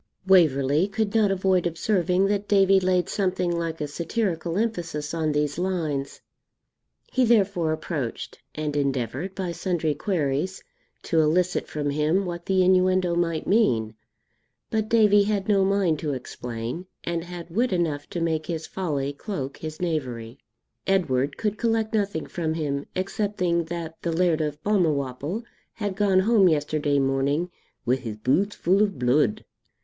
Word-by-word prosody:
Waverley 155 -3 +4
could 205 +1 -2
not 220 -3 +4
avoid 190 -2 +2
observing 180 +2 +1
that 205 0 0
Davie 195 -1 +5
laid 185 -1 +1
something 185 -3 0
like 165 -1 -3
a 150 - -2
satirical 170 +1 -2
emphasis 170 -9 -2
on 160 -2 0
these 150 +1 -1
lines. 160 -7 -2 0.9
He 260 - +3
therefore 200 -8 +3
approached, 150 -6 -4 0.2
and 150 -1 -3
endeavoured, 140 - -2
by 185 -3 -3
sundry 170 -2 -1
queries, 155 +1 -1 0.4
to 165 - +1
elicit 175 +4 +1
from 145 -2 -2
him 155 +7 +1
what 175 -1 -6
the 190 -1 +3
innuendo 185 -1 +3
might 165 -2 0
mean; 120 - +2 0.8
but 220 -1 0
Davie 210 -3 +5
had 205 -2 -1
no 200 -2 +4
mind 190 -5 +2
to 150 -3 -2
explain, 125 +5 -6 0.2
and 170 -1 -2
had 175 -1 -8
wit 235 +7 +1
enough 160 -5 -1
to 175 - -4
make 160 -2 -1
his 160 -2 -3
folly 145 -8 -2
cloak 140 -5 -5
his 155 -1 -7
knavery. 130 -8 -3 0.5
Edward 145 -8 +1
could 215 -1 -2
collect 225 -1 0
nothing 200 -7 0
from 160 -2 -3
him, 140 -3 -2
excepting 185 -3 -1
that 165 -1 -6
the 170 - -1
Laird 165 -1 +2
of 150 0 -3
Balmawhapple 155 - 0 0.3
had 205 -3 -3
gone 195 -2 +3
home 210 -2 +4
yesterday 150 -1 +1
morning 140 +5 +1 0.3
'wi' 125 +2 +2
his 115 -4 -6
boots 175 - +1
fu' 185 +3 +2
o' 210 - +5
bluid.' 125 - +1
170 Hz, 150 wpm, -25 LUFS, 150-195 Hz, 0.9 s, Davie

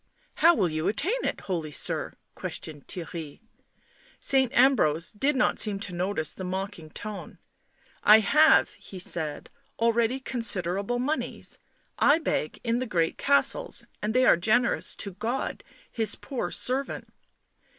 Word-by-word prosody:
"How 335 +2 +6
will 185 - +1
you 155 +1 -2
attain 370 - -1
it, - - -2
holy 165 -5 -3
sir?" - - -1 0.2
questioned 150 -3 -7
Theirry. 165 -4 -7 0.8
Saint 265 -3 +4
Ambrose 180 - +3
did 270 +7 0
not 260 - +1
seem 205 -2 -1
to 190 -4 -3
notice 175 -2 -2
the 185 - -8
mocking 185 -3 -5
tone. 210 +6 -8 0.4
" - - -41 0.3
I 215 +1 +8
have," 305 +9 +5
he 190 - -12
said, 160 -4 -3
" - - -40
already 230 +2 +2
considerable 205 -3 0
moneys. 290 +6 -3 0.4
I 290 +2 +5
beg 235 - -2
in 235 0 0
the 255 - -3
great 165 -5 0
castles, 285 - +2 0.2
and 215 +2 -2
they 255 0 +4
are - - +6
generous 235 +7 +1
to 200 - -2
God 225 +7 -3 0.3
His 225 -2 0
poor 265 -4 -4
servant. 265 +2 -2
215 Hz, 145 wpm, -27 LUFS, 180-255 Hz, 0.8 s, I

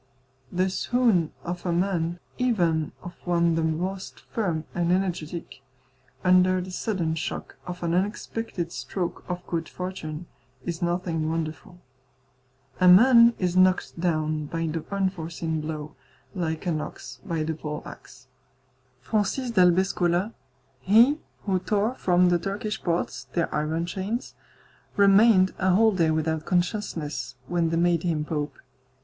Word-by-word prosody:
The 185 +1 +1
swoon 220 -7 +2
of 175 0 -5
a 180 - -1
man, 175 -1 0 0.2
even 175 -11 +1
of 175 - -7
one 170 -1 +2
the 165 - +1
most 180 +5 -3
firm 175 -8 -2
and 175 0 0
energetic, 175 -3 -2 0.6
under 185 0 +4
the 185 +1 -6
sudden 180 -5 -1
shock 160 - -5
of 180 0 -6
an 170 0 0
unexpected 195 -1 -2
stroke 170 +7 -4
of 180 0 -4
good 165 -1 -3
fortune, 180 -3 -6 0.4
is 170 -1 -4
nothing 170 -2 -1
wonderful. 165 +3 -4 1.0
A 185 - +5
man 235 +5 +8
is 180 -1 -1
knocked 185 -2 +3
down 155 -3 0
by 165 +2 -2
the 160 0 -3
unforeseen 170 -5 -2
blow, 155 -1 -6 0.4
like 165 -3 -3
an 160 -4 0
ox 130 -3 -8
by 165 -2 -2
the 160 +1 -2
poleaxe. 150 -4 -8 0.7
Francis 215 - -1
d'Albescola, 185 0 +3 0.5
he 230 - +5 0.2
who 190 -3 +1
tore 210 +5 0
from 180 -6 +3
the 175 -1 +3
Turkish 210 +4 -3
ports 160 -6 -2
their 170 - 0
iron 155 +3 -1
chains, 200 +7 -4 0.6
remained 200 -1 +5
a 185 -1 +3
whole 220 +2 +5
day 170 -5 +2
without 160 0 0
consciousness 175 - -2
when 170 +2 0
they 165 - 0
made 170 -1 +2
him 160 -4 -1
pope. 150 -1 -3
175 Hz, 135 wpm, -26 LUFS, 160-190 Hz, 1.0 s, man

